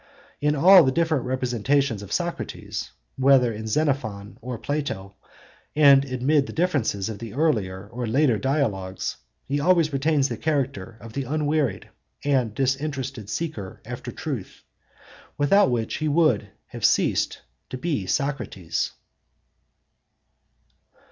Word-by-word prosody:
In 150 0 +1
all 180 +6 +8
the 130 - +2
different 160 -3 +1
representations 130 -1 0
of 100 -1 -10
Socrates, 175 -1 -3 0.3
whether 130 -3 +4
of 110 +1 -6
Xenophon 110 -7 -1
or 125 0 -5
Plato, 115 -8 -3 0.6
and 140 -2 +7
amid 135 +2 +1
the - - -7
differences 145 - 0
of 110 -3 -6
the 115 0 -8
earlier 105 -11 0
or 120 +2 -5
later 125 -1 +2
Dialogues, 105 -10 -1 0.3
he 145 +2 0
always 165 -1 +3
retains 140 0 +2
the - - -4
character 135 -8 -2
of 115 0 -10
the 140 -1 -3
unwearied 150 -1 -1 0.3
and 130 -7 +1
disinterested 135 -4 -2
seeker 105 - -4
after - - -6
truth, - - -6 0.7
without 145 +3 +4
which 115 -3 -1
he 155 - -1
would 145 -10 +2 0.2
have - - -9
ceased - - +2 0.3
to 130 - -5
be 140 - -2
Socrates. 140 - -2
135 Hz, 125 wpm, -24 LUFS, 110-150 Hz, 0.7 s, all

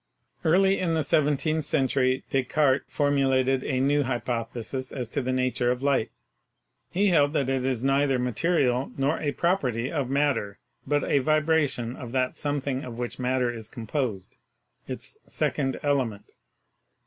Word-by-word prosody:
Early 190 +4 +4
in 170 -3 0
the 160 - +1
seventeenth 150 +2 +1
century 130 -3 +1
Descartes 135 +1 +2
formulated 135 -2 +2
a 130 -2 -1
new 145 +2 +3
hypothesis 120 0 -3
as 125 -4 -4
to 140 - -2
the 130 0 -2
nature 130 -1 0
of 125 +1 -1
light. 135 -5 +2 0.8
He 200 +3 +2
held 145 -4 +3
that 135 -4 0
it 130 -1 0
is 130 -2 -1
neither 135 0 +2
material 125 +1 +1
nor 140 +4 +1
a 145 - -1
prop 175 +7 +1
erty 125 0 -2
of 140 -6 -2
matter, 135 -8 0 0.3
but 145 -1 +1
a 140 - +2
vibration 155 -5 +1
of 125 -3 -8
that 130 -1 0
something 140 -2 -2
of 120 -2 -7
which 120 +1 -4
matter 125 -1 0
is 110 -2 -8
composed, 115 -5 -4 0.5
its - - -7
"second 135 -3 -1
element." 130 -8 -1
135 Hz, 150 wpm, -26 LUFS, 125-145 Hz, 0.8 s, Early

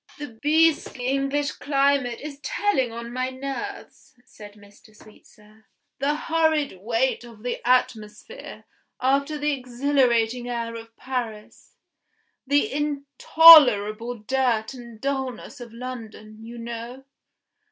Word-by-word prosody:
"The 240 -7 -10
beastly 305 -4 +1
English 275 +2 -1
climate 275 -4 0
is 285 -1 -8
telling 290 - -1
on 235 +1 -8
my 255 +1 -2
nerves," 275 +11 -8
said 210 -4 -14
Mr. 205 +1 -20
Sweetsir 215 0 -20 0.3
"the 290 +2 0
horrid 315 - 0
weight 235 +4 -1
of 230 -3 -14
the 245 - -4
atmosphere, 245 - -2 0.4
after 280 +3 0
the 295 0 -1
exhilarating 250 -2 0
air 235 -1 -4
of 230 0 -11
Paris; 235 -5 -7 0.7
the 285 0 +1
intolerable 280 -6 +5
dirt 230 0 -1
and 235 -3 -12
dullness 265 0 -4
of 235 -2 -10
London, 225 -3 -9
you 235 +1 -10
know. 235 +2 -8
250 Hz, 110 wpm, -24 LUFS, 230-280 Hz, 0.7 s, intolerable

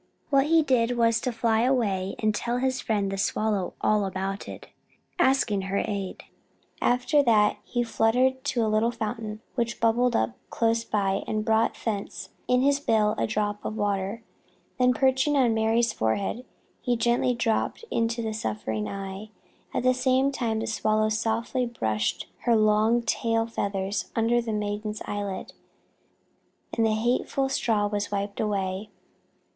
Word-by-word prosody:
What 275 0 +4
he 325 0 +5
did 245 -3 +1
was 230 -1 +3
to 255 - -1
fly 225 -1 +1
away 210 -7 +1
and 215 -1 +1
tell 240 +3 -1
his 260 0 0
friend 205 -3 0
the 195 - -3
Swallow 205 -2 0
all 210 -1 +2
about 195 +1 -4
it, - - -9 0.5
asking 260 - +3
her 200 - 0
aid. 200 -3 -4 0.6
After 250 +4 +3
that 215 -5 +3
he 240 -1 -1
fluttered 250 +3 +2
to 240 -5 +1
a - - 0
little 215 +2 +2
fountain 220 -2 -4
which 235 -2 -2
bubbled 235 +2 +2
up 110 +1 +1 0.2
close 230 0 +1
by 195 -3 0
and 215 0 -1
brought 225 0 +2
thence 200 -3 -3 0.2
in 250 0 +3
his 280 0 +3
bill 215 -6 +2
a 115 - +1
drop 205 - -2
of 215 - -4
water. 205 +1 -1 0.6
Then, 250 0 +4
perching 265 +2 +2
on 245 -4 +4
Mary's 225 +1 +2
forehead, 195 - -1 0.4
he 245 -2 0
gently 240 +2 +2
dropped 230 -2 0
this 460 - -13
into 230 0 0
the 220 -1 -2
suffering 110 - -3
eye. 195 +2 -6 0.4
At - - -2
the 255 0 +4
same 260 +2 +2
time 230 -5 -1
the - - -2
Swallow 215 -1 +1
softly 225 +3 -1
brushed 110 - -1 0.2
her 235 -2 +4
long 215 +2 +3
tail 225 -1 0
feathers 200 -3 -2
under 235 +1 +2
the 230 -1 -4
maiden's 210 0 -3
eyelid, 205 -2 -4 1.2
and 230 - +2
the 215 - +1
hateful 250 +4 0
straw 220 -5 +1
was 205 0 -2
wiped 200 0 -3
away. 200 -1 -2
225 Hz, 160 wpm, -26 LUFS, 205-240 Hz, 1.2 s, he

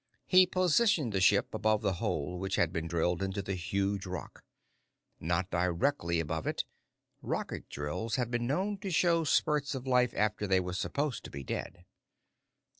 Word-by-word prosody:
He 185 0 +6
positioned 180 - +2
the 95 - +1
ship 90 - +4
above 110 -1 +1
the 95 - +1
hole 90 +5 -2
which 95 0 -2
had 85 -2 +1
been 80 0 -2
drilled 85 +2 0
into 95 +1 -2
the 95 - -3
huge 95 +2 -1
rock. 90 0 -7 0.8
Not 85 +3 -1
directly 85 - +1
above 80 0 -2
it - - -1 0.6
rocket - - -4
drills 75 +11 -3
had 120 -2 -1
been 120 0 -1
known 190 +8 -1
to 195 - -4
show 170 -1 +3
spurts 150 -1 +1
of 130 0 -5
life 125 -2 +2
after 105 0 0
they 95 -1 +4
were 90 -1 -3
supposed 140 +8 -2
to - - -7
be 70 0 -7
dead. 85 +5 -5
100 Hz, 170 wpm, -31 LUFS, 90-140 Hz, 0.8 s, He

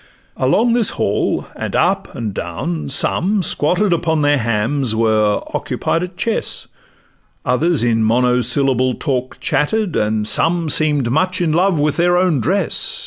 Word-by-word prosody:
Along 215 - +2
this 235 -3 +3
hall, - - -1
and - - -5
up - - 0
and 110 -4 -4
down, 135 - -4
some, 190 +8 +1
squatted 175 +6 +1
Upon 160 -2 0
their 145 -1 +3
hams, 115 +2 0
were 110 -2 +1
occupied 165 - -2
at 180 0 -6
chess; 225 +3 -3 0.8
Others 150 +2 +1
in 115 -2 +1
monosyllable 125 +2 +2
talk 130 -4 -3
chatted, 200 +4 -1
And 105 0 0
some 165 +3 +1
seem'd 145 -6 +1
much 185 +6 0
in 170 -3 0
love 180 0 +2
with 150 0 0
their 175 +1 +3
own 180 -6 +2
dress. 180 - 0
145 Hz, 140 wpm, -17 LUFS, 120-175 Hz, 0.8 s, this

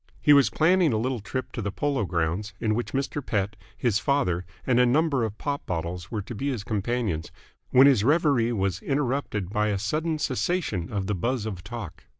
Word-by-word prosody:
He 150 - +6
was 140 -2 +6
planning 170 -2 +3
a - - +1
little 125 +2 -1
trip 120 +6 -4
to 120 - -4
the 100 -1 -2
Polo 140 -1 -1
Grounds, 90 +5 -2
in 110 -2 +1
which 120 +2 -2
Mr. 140 +1 -2
Pett, 105 -3 -1 0.2
his 115 -4 +1
father, 120 - 0 0.2
and 125 -2 +3
a - - +6
number 140 -1 +2
of 110 -1 -3
pop 145 -1 -3
bottles 85 +1 -3
were 110 -4 -3
to 115 - -7
be 135 +6 -2
his 120 -7 -3
companions, 105 -5 -2 0.4
when 130 +2 +7
his 130 -7 +5
reverie 140 -4 +3
was 95 -5 -1
interrupted 130 -9 -1
by 105 0 +1
a 105 -2 0
sudden 155 - -1
cessation 140 - -1
of 100 -3 -2
the 105 - -1
buzz 115 +5 -1
of 95 -5 -5
talk. 100 -8 -8
115 Hz, 200 wpm, -26 LUFS, 100-140 Hz, 0.4 s, when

